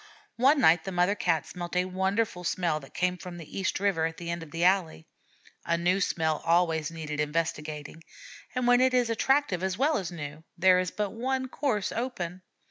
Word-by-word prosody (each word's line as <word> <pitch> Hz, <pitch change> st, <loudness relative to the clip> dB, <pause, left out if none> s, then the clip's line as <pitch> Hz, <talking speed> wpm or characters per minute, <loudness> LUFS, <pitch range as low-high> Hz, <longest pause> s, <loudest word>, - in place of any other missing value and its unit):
One 275 Hz, +5 st, +5 dB
night 165 Hz, -8 st, +5 dB
the 195 Hz, -, -5 dB
mother 180 Hz, +2 st, +2 dB
Cat 170 Hz, -6 st, 0 dB
smelt 175 Hz, -1 st, -7 dB
a 180 Hz, 0 st, +2 dB
wonderful 190 Hz, +1 st, -1 dB
smell 170 Hz, -3 st, 0 dB
that 135 Hz, -, -15 dB
came 180 Hz, 0 st, 0 dB
from 180 Hz, -1 st, -8 dB
the 165 Hz, -3 st, -10 dB
East 190 Hz, -1 st, -1 dB
River 190 Hz, -5 st, +1 dB
at 165 Hz, -, -8 dB
the 170 Hz, -1 st, -5 dB
end 170 Hz, 0 st, -3 dB
of 165 Hz, -, -9 dB
the 165 Hz, +2 st, -3 dB
alley. 180 Hz, -, +2 dB, 0.6 s
A 170 Hz, -, +1 dB
new 180 Hz, +3 st, +1 dB
smell 160 Hz, -4 st, 0 dB
always 165 Hz, -2 st, +2 dB
needs 160 Hz, -2 st, -7 dB
investigating, 150 Hz, 0 st, -3 dB, 0.5 s
and 250 Hz, -1 st, 0 dB
when 245 Hz, 0 st, +5 dB
it 260 Hz, 0 st, +3 dB
is 245 Hz, -2 st, +2 dB
attractive 265 Hz, -5 st, +1 dB
as 190 Hz, -1 st, -1 dB
well 290 Hz, +3 st, +2 dB
as 185 Hz, -2 st, -5 dB
new, 150 Hz, -2 st, -7 dB
there 180 Hz, +1 st, +5 dB
is 185 Hz, -1 st, -1 dB
but 205 Hz, +1 st, -3 dB
one 260 Hz, +3 st, -2 dB
course 235 Hz, -9 st, -1 dB
open. 185 Hz, -8 st, -4 dB
180 Hz, 200 wpm, -28 LUFS, 165-205 Hz, 0.6 s, One